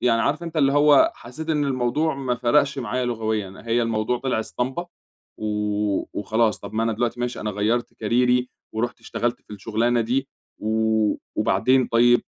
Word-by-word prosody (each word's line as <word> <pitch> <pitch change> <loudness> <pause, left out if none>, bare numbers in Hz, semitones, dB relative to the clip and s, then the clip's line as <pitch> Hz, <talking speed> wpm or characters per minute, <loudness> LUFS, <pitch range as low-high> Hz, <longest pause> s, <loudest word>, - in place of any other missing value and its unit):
يعني 115 -2 +3
عارف 150 +4 0
أنت 165 -1 -6
اللي 140 -2 +3
هو 145 -1 +5
حسّيت 145 +7 -9
إن 150 -2 +1
الموضوع 135 +4 0
ما 130 -3 -1
فرقش 135 +3 +2
معايا 125 +1 -2
لغويًا، 110 -5 -3
هي 120 +1 +2
الموضوع 115 +1 0
طلع 125 -3 -1
اسطمبة 130 +10 -3 0.5
و 105 -1 -1
وخلاص، 110 +2 +1
طب 100 +1 -9
ما 110 - +1
أنا 115 0 +1
دلوقتي 120 +2 -2
ماشي، 125 0 -2
أنا 105 - -2
غيّرت 105 +4 -1
كاريري 125 +3 +2 0.2
ورُحت 120 +2 -3
اشتغلت 120 +1 -2
في - - -28
الشغلانة 115 +4 0
دي 130 +4 -1 0.3
و 110 0 +1 0.2
وبعدين 125 +6 +3
طيب 120 +1 +4
120 Hz, 165 wpm, -23 LUFS, 110-130 Hz, 0.5 s, هو